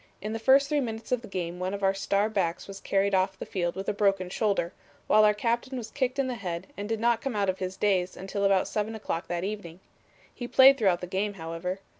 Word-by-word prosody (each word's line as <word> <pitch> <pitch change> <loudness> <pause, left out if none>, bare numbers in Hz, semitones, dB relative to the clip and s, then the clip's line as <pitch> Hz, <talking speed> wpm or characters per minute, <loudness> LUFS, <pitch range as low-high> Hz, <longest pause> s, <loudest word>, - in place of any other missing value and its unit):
In 210 +3 -4
the 225 - -3
first 270 +4 +5
three 295 0 +1
minutes 225 -3 -5
of 250 -2 +1
the 230 - -10
game 180 -2 -4
one 185 +2 -2
of 200 - -7
our 195 0 +4
star 200 +1 +1
backs 185 -5 -2
was 195 0 -8
carried 200 +1 0
off 190 0 +1
the - - -6
field 175 -2 -2
with 195 +1 -5
a - - +1
broken 195 -3 +1
shoulder, 195 -4 0 0.3
while 215 - +5
our 210 0 +5
captain 240 +4 -1
was 225 -3 -6
kicked 260 -1 -1
in 275 - +1
the 255 - -2
head 185 -5 -5
and 205 +1 -6
did 225 -1 -1
not 235 0 +2
come 270 -5 -3
out 200 -2 +1
of 185 - -2
his 185 0 -4
daze 190 -3 +1
until 195 +2 -4
about 195 -1 +3
seven 215 +1 -2
o'clock 190 -5 -4
that 175 0 -3
evening. 190 -4 -5 0.5
He 245 - -6
played 270 +2 +7
throughout 190 -5 +2
the - - -3
game, 195 +3 -2
however. 165 +2 -5
200 Hz, 250 wpm, -27 LUFS, 185-225 Hz, 0.5 s, played